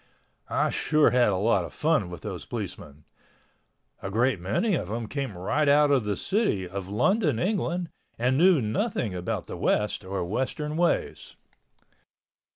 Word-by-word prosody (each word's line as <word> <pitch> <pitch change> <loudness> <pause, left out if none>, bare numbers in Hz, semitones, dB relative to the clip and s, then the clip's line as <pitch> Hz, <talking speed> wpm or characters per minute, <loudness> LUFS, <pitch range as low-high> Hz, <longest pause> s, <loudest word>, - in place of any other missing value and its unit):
I - - +1
sure 155 -1 +3
had 125 -1 +4
a 100 - +1
lot 100 -1 +2
of 85 - -9
fun 155 - +1
with 90 -3 -8
those - - -6
policemen. 75 +1 -7 1.0
A 95 - -4
great 115 +1 +1
many 105 - 0
of - - -1
them 115 +2 -3
came 135 -7 -4
right 140 +11 +1
out 145 0 +5
of 130 -6 +2
the 105 -1 -1
city 190 - 0
of 95 +1 -6
London, 150 - +2
England, 180 - -1 0.3
and 125 +3 +1
knew 170 0 +5
nothing 110 - -1
about 90 -1 -3
the - - -7
West 105 0 0
or 95 -1 -3
Western 130 - -2
ways. 175 +1 -1
120 Hz, 160 wpm, -26 LUFS, 100-155 Hz, 1.0 s, out